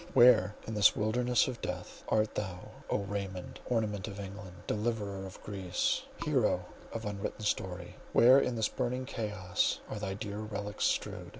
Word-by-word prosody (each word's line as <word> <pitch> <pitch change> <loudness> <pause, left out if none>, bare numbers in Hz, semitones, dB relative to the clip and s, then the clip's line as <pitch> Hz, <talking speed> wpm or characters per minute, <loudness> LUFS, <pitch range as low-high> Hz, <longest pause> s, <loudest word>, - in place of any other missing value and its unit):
Where, 110 -5 +7
in 110 - -4
this 105 -1 +6
wilderness 120 +3 +2
of 125 -3 -5
death, - - -5
art 110 0 +2
thou, 95 -3 -4 0.2
O - - +2
Raymond—ornament 100 +2 -2
of 100 -1 -6
England, 95 -2 -8
deliverer 105 -3 -1
of 95 - -11
Greece, 95 -4 0 0.2
"hero - - +2 0.3
of 115 -1 -4
unwritten 105 +1 -4
story," 90 -3 -2
where 130 +3 +8
in 125 -3 0
this 110 -2 +2
burning 125 0 -2
chaos 105 -7 0
are 105 - -4
thy 95 -1 -3
dear 105 0 -4
relics 105 -1 -3
strewed? - - -1
105 Hz, 155 wpm, -32 LUFS, 95-115 Hz, 0.3 s, where